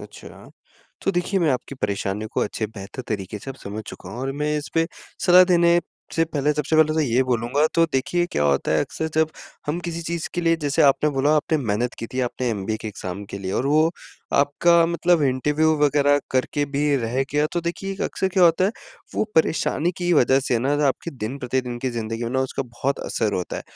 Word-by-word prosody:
अच्छा। - - -12 0.5
तो 195 - +3
देखिए, 185 +2 0
मैं 165 -3 +3
आपकी 130 +1 -3
परेशानी 100 -2 -2
को - - 0
अच्छे 110 +1 -2
बेहतर 105 +3 -8
तरीके 100 -1 -4
से 135 - -8
अब 135 - -9
समझ 105 +2 -5
चुका - - -9
हूँ 120 - -7
और 135 +1 -2
मैं 150 0 +1
इसपे 165 +2 -1 0.4
सलाह 180 0 +8
देने 170 -1 +4 0.4
से 165 - +3
पहले 150 -2 0
सबसे 150 +1 0
पहले 155 -1 +5
तो 160 - +2
ये 130 -3 +2
बोलूँगा, 125 +4 +1
तो 165 - +5
देखिए 175 +7 +1
क्या 75 - +1
होता 70 -1 +1
है - - +3
अक्सर 160 - -3
जब 160 0 +2 0.4
हम 150 +3 -1
किसी 170 -1 -4
चीज़ 170 0 -3
के 175 - 0
लिए 165 -1 +3
जैसे 145 +3 +2
आपने 150 +1 +4
बोला 145 +2 +2
आपने 155 +1 +1
मेहनत 120 -1 -1
की 115 - -4
थी, 130 - -3
आपने 125 0 -2
एमबीए 110 0 -2
के 110 - -4
एग्ज़ाम 100 -1 -6
के 100 - -5
लिए 95 0 -4
और 130 - 0
वो 155 +3 +4 0.4
आपका 165 +4 +4
मतलब 170 -1 +2
इंटरव्यू 150 +4 +2
वगैरह 145 0 +3
करके 140 +3 0
भी 145 0 +2
रह 125 +1 0
गया। 150 +1 +2
तो 175 - 0
देखिए, 175 +3 -4
एक 195 - -9
अक्सर 190 - -1
क्या 185 0 +2
होता 170 +2 +5
है, 195 - +2 0.4
वो - - +1
परेशानी 160 +1 +2
की 175 -1 0
वजह 135 -3 +4
से 125 -3 0
ना, 135 +5 +1
जो 150 - 0
आपके 140 +5 -1
दिन-प्रतिदिन 125 0 -3
की 130 - 0
ज़िंदगी 115 0 -4
में 115 - -3
ना 130 0 0
उसका 130 +1 -2
बहुत 130 +2 -3
असर 110 -3 -1
होता 90 - -3
है, - - -5
140 Hz, 220 wpm, -23 LUFS, 120-165 Hz, 0.5 s, सलाह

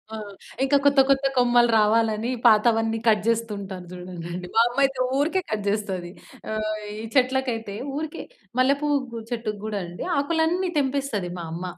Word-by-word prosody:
ఆ! - - -5 0.5
ఇంకా 280 +1 +4
కొత్త 280 -1 +5
కొత్త 275 0 +3
కొమ్మలు 240 -1 +4
రావాలని 220 +1 +2 0.2
పాతవన్నీ 225 0 +4
కట్ 210 -2 +4
చేస్తూ 230 -1 +1
ఉంటా‌ను. 190 -2 -8
చూడండండి 180 0 -7
మా 225 - +7
అమ్మ 240 +2 -7
అయితే 270 -1 -3 0.2
ఊరికే 330 +6 +1
కట్ 210 -2 -2
చేస్తది. 195 -4 -2 0.4
ఆహ్, 215 0 -1 0.2
ఈ - - -5
చెట్లకైతే 250 -5 +1 0.2
ఊరికే 315 +2 -4 0.4
మల్లెపువ్వు‌కు 275 -2 +1
చెట్టుకి 220 -3 -3
గూడా 215 -2 -2
అండి 175 +1 -7
ఆకులన్నీ 330 +5 +1
తెంపేస్తది 265 -10 -1
మా - - -5
అమ్మ. 175 +2 -5
230 Hz, 150 wpm, -24 LUFS, 210-270 Hz, 0.5 s, మా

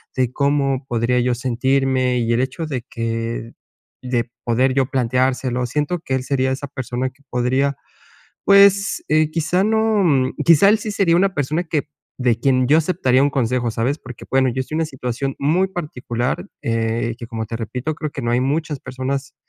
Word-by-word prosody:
de 125 -1 0
cómo 140 -1 +1
podría 120 +1 +1
yo 125 0 +1
sentirme. 130 +1 +1
Y 115 0 +1
el 120 - +2
hecho 130 +5 -3
de 135 -5 -3
que 115 0 -3 0.5
de 120 -2 -1 0.2
poder 130 +3 +2
yo 135 -1 +2
planteárselo. 125 -1 0
Siento 150 +7 -1
que 135 -4 -2
él 130 - -2
sería 130 -1 0
esa 135 +2 -4
persona 130 -2 -3
que 130 - -29
podría, 130 +3 0 0.7
pues, 200 0 +5
eh, 155 0 +3
quizá 170 +4 +1
no, 220 -1 +2
mm, 135 -6 +2
quizá 165 +5 +6
él 215 - +4
sí 210 0 -4
sería 185 -4 +3
una 190 +1 +2
persona 150 +5 -1
que 155 -4 -2 0.3
de 120 -3 +1
quien 130 -1 +2
yo 150 +3 +6
aceptaría 150 -6 +2
un 140 - +4
consejo, 125 -2 0
¿sabes? 125 +7 -1
Porque, 125 -5 -10
bueno, 130 0 +3
yo 130 +2 -3
estoy 140 +4 -4
en - - 0
una 160 - 0
situación 135 0 -4
muy 165 +7 +2
particular, 130 -8 -3 0.2
eh, 115 0 -1
que 120 - -7
como 115 -1 -4
te 115 - -4
repito, 125 +7 -4
creo 155 -2 -4
que 140 - -5
no 120 - -1
hay 120 - +2
muchas 150 +2 -1
personas, 130 +2 -4
130 Hz, 190 wpm, -20 LUFS, 125-150 Hz, 0.7 s, quizá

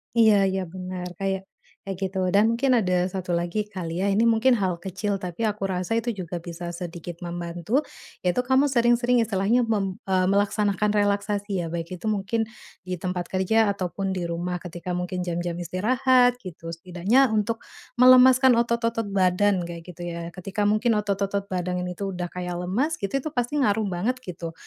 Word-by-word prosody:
Iya 220 -2 +6 0.2
iya, 190 - -1
benar. 185 -1 -5
Kayak 195 0 -2 0.3
kayak 195 -2 -6
gitu. 190 0 -3 0.2
Dan 220 +3 +5
mungkin 255 +1 +3
ada 180 -3 +1
satu 185 -1 -4
lagi 175 +5 -1
kali, 180 -3 -4
ya. - - +1
Ini 215 - +3
mungkin 230 +3 +4
hal 190 -6 0
kecil, 195 +3 -3
tapi 180 +2 -6
aku 205 -1 -3
rasa 185 +4 -1
itu 230 0 -1
juga 180 -3 -5
bisa 170 0 -6
sedikit 175 -1 -7
membantu, 175 - -1 0.4
yaitu 180 +7 +1
kamu 270 +2 +3
sering-sering 240 0 +3
istilahnya 220 +4 +2
mem 195 -4 -1
eee, 185 -1 +2
melaksanakan 205 +1 +1
relaksasi, 205 -2 0
ya, - - -3
baik 170 +2 -4
itu 175 - -11
mungkin 215 +2 -1 0.4
di 180 -1 -5
tempat 180 -1 -2
kerja 220 +4 +3
atau 185 -2 -3
pun 195 +2 -3
di 175 -2 -3
rumah 175 +1 -3
ketika 175 0 -6
mungkin 180 0 -3
jam-jam 175 0 -2
istirahat, 245 +8 +3
gitu, 165 -2 -8
setidaknya 185 +9 +2
untuk 215 +2 0 0.4
melemaskan 255 +1 +7
otot-otot 230 -2 -1
badan, 190 -1 +2
kayak 170 -1 -7
gitu, 175 0 -8
ya, 170 0 -5
ketika 195 +3 -2
mungkin 225 +2 +2
otot-otot 200 0 -2
badang 180 -1 -2
ini 180 -1 -5
tuh 195 -1 -3
udah 175 -1 -4
kayak 180 -1 -4
lemas, 235 - 0
gitu, 200 +7 -1
itu 290 +3 -3
pasti 245 +3 -1
ngaruh 215 -5 +2
banget, 225 +9 -1
gitu, 170 -5 -7
195 Hz, 175 wpm, -25 LUFS, 180-225 Hz, 0.4 s, melemaskan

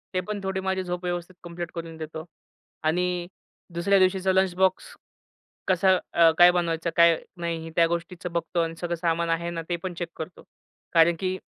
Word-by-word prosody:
ते 185 - +2
पण 210 -1 -3
थोडी 190 0 -2
माझी 190 0 -1
झोप 180 0 -4
व्यवस्थित 175 0 -4
कंप्लीट 170 0 -6
करून 165 -1 -6
देतो. 160 0 -6 0.6
आणि 175 +2 0 0.5
दुसऱ्या 195 +4 +3
दिवशीचा 190 0 +3
लंच 190 -1 +2
बॉक्स 190 0 0 0.7
कसा 185 0 +4 0.4
काय 175 0 +8
बनवायचं 170 -1 -1
काय 170 -1 +6 0.2
नाही, 165 -1 -4
त्या 165 -1 +5
गोष्टीचं 170 +1 -4
बघतो 170 +1 -1
आणि 165 0 -2
सगळं 175 -1 -1
सामान 170 0 0
आहे 170 +1 0
ना, 170 -1 -4
ते 175 - +1
पण 185 - -3
चेक 175 - -3
करतो, 160 +3 -8 0.5
कारण 165 0 +5
की 185 0 -1
175 Hz, 170 wpm, -26 LUFS, 165-185 Hz, 0.7 s, काय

